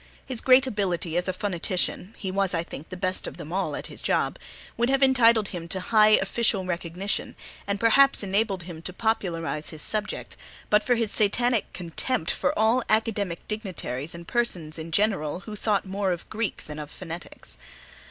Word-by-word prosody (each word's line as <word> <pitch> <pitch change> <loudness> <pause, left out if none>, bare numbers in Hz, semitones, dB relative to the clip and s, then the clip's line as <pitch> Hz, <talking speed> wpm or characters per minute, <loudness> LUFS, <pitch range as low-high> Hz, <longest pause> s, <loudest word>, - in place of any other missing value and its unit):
His 255 -4 -2
great 260 +1 +6
ability 185 -8 -1
as 175 +1 +1
a - - +2
phonetician 185 +1 -2
(he 190 -3 -4
was, 195 -1 +1
I 165 - 0
think, 160 -2 -9
the 185 - -6
best 185 0 -1
of - - -7
them 155 +3 -7
all 195 +1 0
at - - -5
his - - -6
job) - - 0 0.4
would 240 +1 +1
have 270 0 +3
entitled 235 -5 +5
him 170 -2 -6
to 185 - -2
high 215 +2 +5
official 195 -1 +1
recognition, 180 +2 -2 0.3
and 200 0 -1
perhaps 270 +3 +5
enabled 195 -1 0
him 170 -2 -8
to 185 - -5
popularize 170 -8 -1
his 155 -2 -5
subject, 210 -1 -3 0.4
but 210 0 +6
for 245 +3 +2
his 225 -3 0
Satanic 230 +2 +2
contempt 180 +3 -1
for 180 - +1
all 220 +4 +4
academic 210 -5 0
dignitaries 175 - -4
and 170 0 -10
persons 175 -10 -1
in 160 +1 -6
general 185 -4 +1
who 215 +1 -7
thought 210 -1 +1
more 195 0 -1
of 175 -1 -4
Greek 220 -1 -3
than 150 0 -7
of 150 -1 -6
phonetics. 170 +1 -8
195 Hz, 180 wpm, -26 LUFS, 170-220 Hz, 0.4 s, great